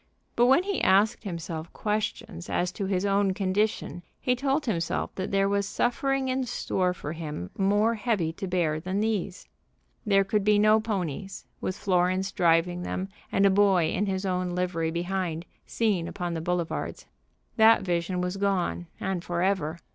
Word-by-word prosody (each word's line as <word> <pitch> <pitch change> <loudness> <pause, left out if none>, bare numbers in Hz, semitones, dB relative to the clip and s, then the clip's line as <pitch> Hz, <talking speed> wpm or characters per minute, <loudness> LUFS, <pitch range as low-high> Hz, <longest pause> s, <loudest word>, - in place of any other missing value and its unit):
But 240 +1 +4
when 270 +8 +5
he 400 0 -2
asked 210 +5 +3
himself 170 -3 -5
questions 210 -4 -3
as 175 0 0
to 195 +1 -4
his 190 0 0
own 200 -1 +2
condition 195 -1 -1 0.2
he 250 - +1
told 275 +3 0
himself 170 -8 -1
that 185 - -4
there 195 0 +2
was 200 0 0
suffering 270 +4 0
in 260 0 0
store 185 -5 0
for 155 -4 -6
him 150 - -6
more 205 +3 +2
heavy 205 -8 -1
to 195 - -5
bear 170 -4 0
than 185 +4 -2
these. 205 -4 -2 0.6
There 195 -3 +4
could 200 +1 0
be 210 0 +4
no 215 +1 +5
ponies, 195 -4 -4 0.2
with 185 - -2
Florence 185 0 +1
driving 175 0 +2
them, 185 +2 -3 0.2
and 195 - +3
a 195 - +6
boy 190 -4 +3
in 205 - 0
his 190 0 -2
own 180 -1 -1
livery 175 -3 -1
behind, 175 -1 -2 0.2
seen 200 -7 0
upon 175 -2 -4
the 165 - -3
boulevards. 175 0 -3 0.5
That 220 -1 +6
vision 180 0 -1
was 180 +2 -2
gone, 195 -3 -1
and 190 -3 -2
forever. 175 -2 0
190 Hz, 165 wpm, -27 LUFS, 175-210 Hz, 0.6 s, a